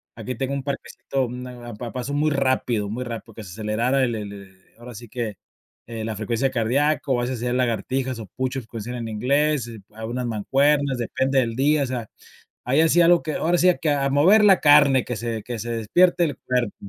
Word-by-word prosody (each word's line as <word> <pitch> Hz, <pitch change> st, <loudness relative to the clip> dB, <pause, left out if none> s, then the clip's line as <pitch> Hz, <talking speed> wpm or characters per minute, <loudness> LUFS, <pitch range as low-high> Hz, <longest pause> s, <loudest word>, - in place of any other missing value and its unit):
aquí 130 Hz, -, -5 dB
tengo 135 Hz, +2 st, -3 dB
un 135 Hz, -, -4 dB
parquecito, 135 Hz, -2 st, -3 dB
mm, 125 Hz, +1 st, -7 dB
a 120 Hz, -1 st, -9 dB
a -, -, -9 dB
pa 115 Hz, +2 st, -7 dB
paso 130 Hz, +2 st, -4 dB
muy 150 Hz, +1 st, +2 dB
rápido, 130 Hz, -6 st, 0 dB
muy 120 Hz, +4 st, -4 dB
rápido, 115 Hz, -2 st, -7 dB
que 110 Hz, -, -8 dB
se 90 Hz, -, -10 dB
acelerara 115 Hz, +6 st, 0 dB
el 120 Hz, -2 st, 0 dB
le 110 Hz, -2 st, -4 dB
le 100 Hz, -1 st, -10 dB, 0.3 s
ahora 120 Hz, 0 st, -10 dB
sí 120 Hz, +3 st, -10 dB
que 115 Hz, -3 st, -4 dB, 0.5 s
eh 115 Hz, -2 st, -6 dB
la 110 Hz, -, -3 dB
frecuencia 115 Hz, +5 st, -1 dB
cardíaco, 135 Hz, +4 st, +1 dB
o 120 Hz, -, +1 dB
a -, -, 0 dB
veces 125 Hz, 0 st, -2 dB
hacía 120 Hz, +1 st, -2 dB
lagartijas 125 Hz, +1 st, -1 dB
o 110 Hz, -, -6 dB
push 130 Hz, +1 st, -2 dB
ups, 115 Hz, -, -12 dB
como 115 Hz, -2 st, -7 dB
se 115 Hz, -, -7 dB
llaman 120 Hz, -2 st, -5 dB
en -, -, -5 dB
inglés, 140 Hz, +2 st, +1 dB
eh, 115 Hz, -, -9 dB, 0.2 s
algunas 115 Hz, +3 st, -4 dB
mancuernas, 135 Hz, +5 st, +1 dB
depende 130 Hz, +3 st, -1 dB
del 115 Hz, -3 st, -1 dB
día, 145 Hz, +3 st, +2 dB
o -, -, 0 dB
sea, 125 Hz, -3 st, -4 dB, 0.6 s
ahí 135 Hz, +5 st, +2 dB
hacía 170 Hz, +1 st, +4 dB
algo 175 Hz, 0 st, +5 dB
que, 155 Hz, -, -2 dB
ahora 175 Hz, +2 st, +1 dB
sí 180 Hz, +1 st, +5 dB
que: 155 Hz, -, +2 dB
"A 140 Hz, -1 st, +1 dB
mover 185 Hz, +10 st, +5 dB
la 195 Hz, -3 st, +6 dB
carne 145 Hz, -3 st, +6 dB
que 125 Hz, -, -4 dB
se 115 Hz, -1 st, -4 dB
que 120 Hz, -2 st, -5 dB
se 120 Hz, -, -5 dB
despierte 175 Hz, -, +2 dB
el 145 Hz, -4 st, -4 dB
cuerpo". 125 Hz, -4 st, -1 dB
125 Hz, 230 wpm, -23 LUFS, 115-140 Hz, 0.6 s, la